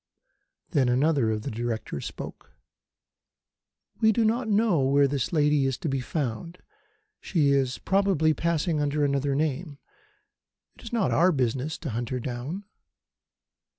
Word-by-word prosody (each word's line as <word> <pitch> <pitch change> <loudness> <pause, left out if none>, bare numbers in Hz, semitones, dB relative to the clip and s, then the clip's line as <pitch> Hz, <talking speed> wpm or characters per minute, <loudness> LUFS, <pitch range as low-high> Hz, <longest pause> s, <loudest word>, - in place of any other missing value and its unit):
Then 130 -4 +2
another 135 -1 +2
of 105 -1 -2
the - - -4
Directors 115 -9 -4
spoke. - - -9 1.5
"We 220 -1 +5
do 225 +1 +2
not 225 +1 0
know 210 -5 +3
where 140 +1 +4
this 140 -2 -2
lady 150 -4 +3
is 135 -2 -1
to - - -4
be 135 -2 0
found. 145 +5 -4 0.6
She 155 -6 +1
is 135 -2 +1
probably 190 -6 +2
passing 165 0 0
under 145 0 +1
another 140 0 0
name. 150 +1 -2 1.0
It - - -16
is 230 - -9
not 230 -5 +1
our 180 +2 +4
business 130 +1 -1
to 155 -6 -5
hunt 120 +1 -3
her 130 - -2
down." 130 - -5
145 Hz, 145 wpm, -26 LUFS, 130-170 Hz, 1.5 s, We